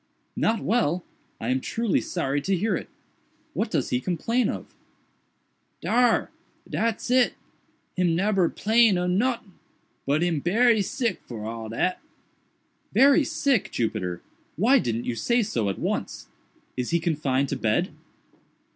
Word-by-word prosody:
"Not 225 0 +1
well! 185 -6 +1 0.4
I 115 - -3
am 130 +1 +1
truly 230 - 0
sorry 145 -5 -2
to 190 +5 0
hear 205 +2 0
it. - - -6 0.6
What - - -1
does - - -1
he 125 - +2
complain 210 - 0
of?" - - -4 1.1
"Dar! 245 -1 +2 0.4
dat's 230 +1 -1
it!—him 185 -7 -1
neber 195 -1 +2
'plain 220 -2 +3
of 180 0 0
notin'—but 190 - -2
him 170 -4 +1
berry 220 - +3
sick 245 +2 -2
for 110 -3 -6
all 115 0 -5
dat." 180 +11 -1 0.9
"Very 280 +3 +5
sick, 275 - +1
Jupiter!—why 115 - -1
didn't 115 - -2
you 125 - -1
say 235 - +1
so 115 - -1
at 95 - -3
once? - - -3 0.5
Is 125 -1 -2
he 170 - +2
confined 140 -5 0
to - - -1
bed?" 115 - 0
180 Hz, 130 wpm, -25 LUFS, -, 1.1 s, Very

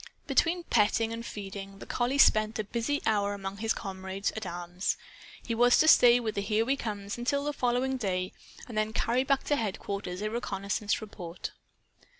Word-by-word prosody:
Between 345 +1 +2
petting 225 -2 +2
and 230 0 -5
feeding, 195 -2 -7
the - - -10
collie 250 +3 0
spent 215 -5 +5
a 215 - -1
busy 235 +7 -2
hour 205 -2 +1
among 195 0 -6
his 220 +1 -1
comrades 190 0 -3
at 220 -3 -4
arms. 175 +1 -2 0.5
He 235 - -1
was 245 +2 +5
to 315 - +4
stay 245 -5 +8
with 225 -3 -2
the 200 - -1
"Here 215 +2 +1
We 270 +3 +2
Comes" 210 -4 -5
until 280 +4 0
the 295 0 -1
following 255 0 0
day, 185 -5 -2 0.3
and 235 - -8
then 215 0 0
carry 240 +3 +1
back 275 0 +1
to 290 - +1
headquarters 200 -3 -3
a 215 - -1
reconnaissance 205 -2 -2
report. 180 -5 -7
215 Hz, 180 wpm, -29 LUFS, 200-245 Hz, 0.5 s, stay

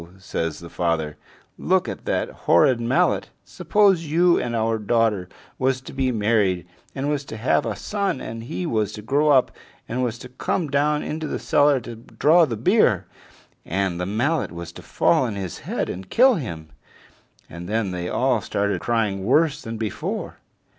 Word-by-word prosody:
says 80 -4 -3
the 85 - -10
father, 80 -3 -1 0.4
"look - - +1
at - - -6
that - - 0 0.2
horrid 120 +8 +5
mallet! 120 +2 +1 0.2
Suppose 195 -5 +2
you 170 +3 +3
and 120 -1 -3
our 115 0 0
daughter 105 -4 +1 0.3
was 130 0 +1
to - - -10
be 135 -1 0
married, 105 -5 +1 0.3
and 135 +1 -2
was 145 -1 -1
to 110 - -7
have 115 +4 +1
a - - -2
son, 200 -8 -2
and 115 0 -7
he 90 -6 -4
was 110 -3 -1
to 105 - -8
grow 145 +6 +2
up, 135 -3 +4 0.4
and 125 +2 -2
was 120 -1 -2
to 125 - -11
come 145 +4 -2
down 150 +1 +1
into 155 0 -4
the - - -3
cellar 145 -2 +3
to 120 0 -8
draw 155 +8 +3
the 115 -6 -4
beer, 115 - +3 0.6
and 95 -1 -1
the 90 - -2
mallet 135 +9 0
was 85 0 -7
to - - -11
fall 130 - +2
on 110 -4 -3
his 95 -4 -5
head - - -1
and 95 +1 -7
kill 260 +2 +5
him!" 85 - -5 0.8
And 85 +2 -9
then 110 -3 0
they 90 -1 -4
all - - +1
started 100 -2 -1
crying 110 -5 0
worse 150 +7 +2
than 115 0 -6
before. 110 -3 -4
115 Hz, 180 wpm, -23 LUFS, 95-145 Hz, 0.8 s, horrid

